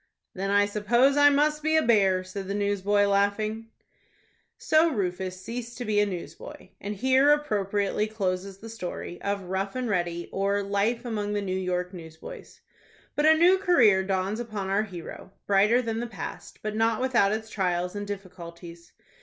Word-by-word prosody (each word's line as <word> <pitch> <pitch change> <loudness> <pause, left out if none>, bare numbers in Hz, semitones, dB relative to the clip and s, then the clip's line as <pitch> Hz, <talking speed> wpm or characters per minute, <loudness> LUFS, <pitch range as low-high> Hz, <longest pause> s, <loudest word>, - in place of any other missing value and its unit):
"Then 195 +1 -3
I 205 0 +4
suppose 235 +7 +2
I 290 0 +7
must 300 +1 +2
be 315 +1 +1
a 315 - +3
bear," 195 -5 +3
said 185 +1 -7
the 200 - -3
newsboy, 205 0 +1
laughing. 205 +3 0 0.9
So 315 +2 +3
Rufus 185 - -3
ceased 235 +4 -7
to 245 - -5
be 210 -1 +1
a 205 - +3
newsboy, 180 -3 -8
and 205 +1 -5
here 260 +6 +3
appropriately 210 -7 0
closes 195 -2 -3
the 220 - -11
story 180 -5 -6
of 200 -1 -2
"ROUGH 190 +3 -3
AND 255 -2 -2
READY; 175 -2 -2
or, 200 +1 0
Life 205 +5 -1
among 210 -3 -2
the 205 - -1
New 185 -1 -2
York 180 -1 -2
Newsboys." 160 -3 -11 0.5
But 295 +1 +3
a 315 - +7
new 360 +3 +5
career 240 - +4
dawns 190 +3 -1
upon 210 -5 -4
our 200 +2 +2
hero, 190 -2 -8
brighter 210 +5 +3
than 225 -1 -2
the 240 - -3
past, 195 -8 -8
but 215 0 -3
not 225 0 +1
without 245 -6 +2
its 220 +1 -4
trials 180 -1 -1
and 205 0 -4
difficulties. 170 -3 -9
205 Hz, 170 wpm, -26 LUFS, 190-230 Hz, 0.9 s, I